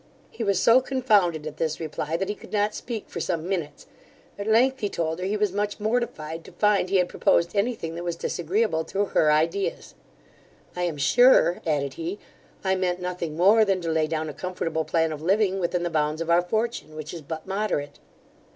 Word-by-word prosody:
He 230 - -5
was 200 -2 +1
so 240 +3 +6
confounded 210 - +2
at 155 -1 -6
this 155 -1 -1
reply, 160 0 -3
that 195 +2 -2
he 205 - -1
could - - -14
not 210 0 +1
speak 230 -4 -6
for - - -6
some 170 -2 -2
minutes: 175 -6 -3 0.5
at 200 - -4
length 255 +4 +3
he 205 - -1
told 160 -1 -2
her, 180 - -3
he 205 +2 0
was 210 -2 +1
much 205 +1 -2
mortified 205 -8 -2
to - - -13
find 210 -3 +2
he 195 - 0
had 180 -2 +3
proposed 170 +2 +1
anything 200 -6 -1
that 170 +1 -6
was 175 -1 -2
disagreeable 175 +1 -1
to 200 +1 -1
her 155 -5 +3
ideas 160 - 0 0.8
'I 180 - -3
am 165 -4 -3
sure 235 - +5
(added 140 -3 0
he) 170 +7 -4 0.5
I 190 -1 +2
meant 185 -1 0
nothing 180 -3 -4
more 205 +6 +6
than 195 -3 +1
to 165 -1 -2
lay 160 -1 +1
down 155 0 -2
a 150 - -5
comfortable 165 -1 -3
plan 160 +1 +1
of 155 -1 -6
living 195 +2 +2
within 175 -1 -1
the 175 - -2
bounds 155 0 0
of 165 0 -1
our 170 +1 +5
fortune, 215 -3 -2
which 155 +1 -7
is 170 - -7
but 160 +2 -6
moderate. 190 -7 -2
180 Hz, 205 wpm, -25 LUFS, 160-205 Hz, 0.8 s, so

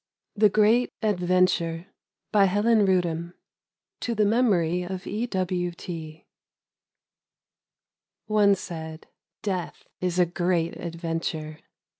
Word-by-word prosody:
THE 210 0 +5
GREAT 215 +4 +3
ADVENTURE: 180 -4 +1 0.5
TO 190 -5 +2 0.8
THE 210 -1 +3
MEMORY 195 -7 +2
OF 185 +1 -5
E. 220 +4 -2
W. 180 -4 -1
T. 160 -2 -8 2.0
ONE 210 -2 +4
said, 160 -3 -7 0.2
— - - -67
' - - -66
Death 185 -4 -3
is 180 -1 -1
a 180 - +5
great 175 -1 0
adventure.' 165 -2 -4
180 Hz, 95 wpm, -26 LUFS, 170-205 Hz, 2.0 s, THE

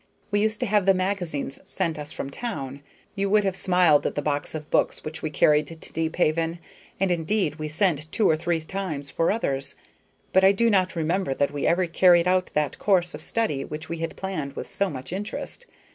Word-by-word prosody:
We 205 0 +2
used 220 0 +1
to - - +2
have 205 -3 +2
the 195 - +6
magazines 180 -7 -2
sent 165 -2 -2
us 150 0 -5
from 135 - -5
town; 140 - -5 0.3
you 200 -1 -1
would 210 +1 +4
have 195 -2 0
smiled 180 -6 +4
at - - -4
the 145 - 0
box 145 +1 -1
of 155 -1 -7
books - - +1
which 155 +1 -5
we 155 - -2
carried 150 0 +3
to 165 - -8
Deephaven, 165 +1 -1 0.4
and 195 -1 +2
indeed 170 -1 0
we 155 -1 -4
sent 155 -2 +1
two 215 - +2
or 160 - +4
three 165 +1 -1
times 155 -5 -4
for 165 - +1
others; 140 -11 -1 0.6
but 190 - +5
I 195 +1 +7
do 230 +3 +2
not 185 -2 +2
remember 165 -2 0
that 140 - +1
we 145 -1 -1
ever 180 +2 +3
carried 175 0 +5
out 185 0 +2
that 150 -3 0
course 180 -3 +2
of - - -6
study 155 -12 -1
which 155 +2 -7
we 165 -1 -4
had 165 0 -4
planned 155 -8 -4
with - - -6
so 200 -1 0
much 130 0 -7
interest. 210 - -5
170 Hz, 210 wpm, -25 LUFS, 150-195 Hz, 0.6 s, I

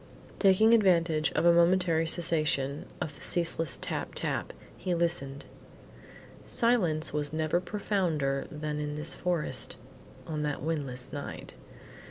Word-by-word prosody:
Taking 210 +3 +5
advantage 170 -7 +3
of 160 - +1
a 170 - +7
momentary 170 -1 +3
cessation 155 -4 +1
of 155 - -4
the - - -15
ceaseless 165 -4 +1
tap - - -4
tap, - - -2 0.2
he 180 -1 -2
listened. 165 -5 -1 1.0
Silence 175 -12 +1
was 150 -1 -1
never 155 +2 0
profounder 175 -9 -1
than 150 0 -4
in 150 0 -3
this 150 +2 +2
forest 175 -3 -1 0.5
on 155 -2 -4
that 145 -2 -3
windless 140 -6 -3
night. 145 -1 -7
160 Hz, 125 wpm, -29 LUFS, 150-175 Hz, 1.0 s, a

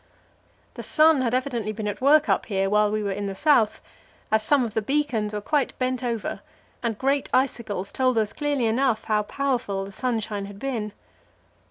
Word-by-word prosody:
The - - -7
sun 310 -3 +4
had 245 -1 +1
evidently 245 -5 -1
been 215 0 -4
at 205 - -4
work 295 +3 +5
up - - +1
here 195 -2 0
while 210 0 +4
we 215 0 -1
were 200 - -1
in 200 +1 -3
the 195 - -4
south, 235 -3 +3 0.5
as 220 0 +3
some 260 +3 +3
of 220 - -6
the 220 - 0
beacons 250 -4 0
were 210 -1 -3
quite 290 +5 0
bent 255 0 -1
over, 235 -3 -2 0.4
and 230 -3 -2
great 275 +2 0
icicles 230 -7 -1
told 255 -2 +1
us 215 -2 0
clearly 290 -4 0
enough 230 0 +1
how 215 -1 +1
powerful 235 -5 -2
the 195 - -9
sunshine 220 -3 -2
had 200 0 -10
been. 220 -4 -3
230 Hz, 190 wpm, -25 LUFS, 210-265 Hz, 0.5 s, work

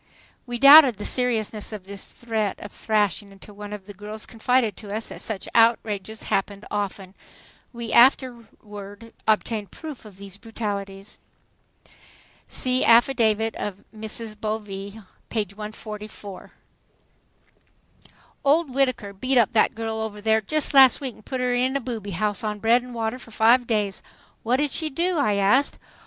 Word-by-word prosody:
We 240 0 -3
doubted 275 -3 +9
the 205 - -5
seriousness 225 -4 -1
of 210 -4 -8
this 200 0 -9
threat 220 -4 -3
of 205 - -9
thrashing 205 -2 -1
until 195 +1 -14
one 205 0 -9
of 205 -2 -7
the 205 - -10
girls 210 +2 -8
confided 235 -2 0
to 205 -2 -9
us 220 +2 -2
that - - -7
such 215 -4 -4
outrages 220 -2 +1
happened 200 +1 -2
often. 195 -2 -4 0.6
We 235 -2 -6
afterward 230 -4 +1
obtained 215 -1 0
proof 305 - -9
of 210 -4 -14
these 200 0 -10
brutalities. 200 -3 -6 1.3
See 255 0 0
affidavit 230 -2 +3
of 200 -1 -5
Mrs. 220 0 -5
Bovee, 210 -1 -5 0.3
page 210 -4 -2
144. 210 -2 -9 1.9
"Old 290 0 +2
Whittaker 255 -7 0
beat 255 +7 0
up 230 -4 +4
that 220 - +2
girl 225 0 -3
over 215 -1 -5
there 220 +1 +2
just 305 +9 -1
last 265 -2 +7
week 265 -4 -5
and 215 - -19
put 260 -2 -3
her 250 0 +1
in 255 +2 +1
the 275 - 0
'booby' 220 -7 -5
house 210 -1 -1
on 210 -1 -2
bread 230 +4 +3
and 250 0 -10
water 225 +2 -2
for 230 - -14
five 230 +2 +3
days." 210 -4 -1 0.4
"What 235 +3 +1
did 290 0 0
she 315 -2 -2
do?" 340 +4 -1
I 210 -8 +2
asked. 205 +8 +2
220 Hz, 155 wpm, -24 LUFS, 205-245 Hz, 1.9 s, doubted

